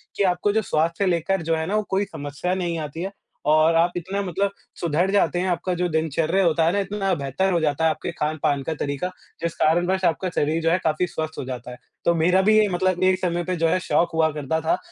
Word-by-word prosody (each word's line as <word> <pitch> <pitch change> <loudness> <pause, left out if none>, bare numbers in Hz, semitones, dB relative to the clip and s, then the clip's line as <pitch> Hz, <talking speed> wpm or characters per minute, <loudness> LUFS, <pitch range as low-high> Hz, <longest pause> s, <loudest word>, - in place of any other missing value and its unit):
कि 200 - +1
आपको 180 +2 +2
जो 220 - +2
स्वास्थ्य 170 0 0
से 190 - +2
लेकर 175 +2 0
जो 165 0 0
है 160 0 -2
ना 215 +2 +1
कोई 195 +1 +1
समस्या 145 0 -4
नहीं 175 -3 -2
आती 155 +2 -5
है। 195 - -4 0.4
और 155 +2 +4
आप 170 +2 +3
इतना 190 +4 -3
मतलब 195 +2 -1 0.3
सुधर 170 +3 +1
जाते 175 -4 +2
हैं, 185 - 0
आपका 175 +1 -1
जो 180 0 0
दिनचर्या 160 +4 +1
होता 165 0 +3
है 170 - +3
ना 200 - +1
इतना 195 -1 -1
बेहतर 145 +8 -1
हो 170 - +2
जाता 150 0 0
है, 160 - +5
आपके 155 +1 -3
खान-पान 150 -3 -1
का 160 - -2
तरीका 145 +5 -2 0.3
जिस 170 0 -1
कारणवश 175 +4 +2
आपका 180 +3 +1
शरीर 155 +3 +1
जो 165 - +3
है 180 - +3
काफ़ी 160 +3 +1
स्वस्थ 160 -1 -5
हो - - -4
जाता 125 -1 -6
है, 125 - -9 0.3
तो 170 - +4
मेरा 180 +4 +3
भी 215 +2 +4
ये 215 -1 +5
मतलब 185 0 0
एक 185 0 +3
समय 175 -1 -1
पे 185 +2 -2
जो 165 -1 +1
है 185 - +2
शौक 170 - +1
हुआ 160 -1 +3
करता 150 +2 -2
था। 345 - +1
170 Hz, 245 wpm, -23 LUFS, 160-185 Hz, 0.4 s, है